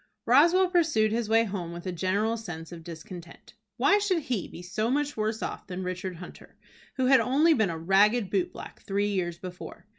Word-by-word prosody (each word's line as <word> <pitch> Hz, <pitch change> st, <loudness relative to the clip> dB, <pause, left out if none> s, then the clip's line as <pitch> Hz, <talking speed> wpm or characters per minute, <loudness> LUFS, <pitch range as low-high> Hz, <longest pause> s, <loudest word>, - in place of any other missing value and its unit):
Roswell 335 Hz, +10 st, +5 dB
pursued 315 Hz, -, +2 dB
his 230 Hz, -1 st, -1 dB
way 225 Hz, +1 st, +4 dB
home 190 Hz, -6 st, -5 dB
with 170 Hz, +1 st, -8 dB
a 185 Hz, -, -2 dB
general 190 Hz, +6 st, 0 dB
sense 175 Hz, -8 st, -8 dB
of 170 Hz, -2 st, -9 dB
discontent. 170 Hz, +1 st, -11 dB, 0.2 s
Why 405 Hz, +1 st, +4 dB
should 375 Hz, -6 st, 0 dB
he 240 Hz, -, -2 dB
be 175 Hz, -, -11 dB
so 215 Hz, +5 st, -2 dB
much 290 Hz, +2 st, 0 dB
worse 215 Hz, 0 st, -2 dB
off -, -, -5 dB
than 185 Hz, 0 st, -5 dB
Richard 185 Hz, 0 st, -4 dB
Hunter, 175 Hz, +1 st, -12 dB, 0.4 s
who 260 Hz, -, 0 dB
had 265 Hz, +1 st, +6 dB
only 295 Hz, +6 st, +3 dB
been 220 Hz, -, +1 dB
a 165 Hz, -, -4 dB
ragged 195 Hz, +5 st, +3 dB
boot 190 Hz, -3 st, 0 dB
black -, -, -11 dB
three 200 Hz, +1 st, -1 dB
years 175 Hz, -4 st, -2 dB
before? 180 Hz, +3 st, -9 dB
205 Hz, 200 wpm, -27 LUFS, 180-255 Hz, 0.4 s, had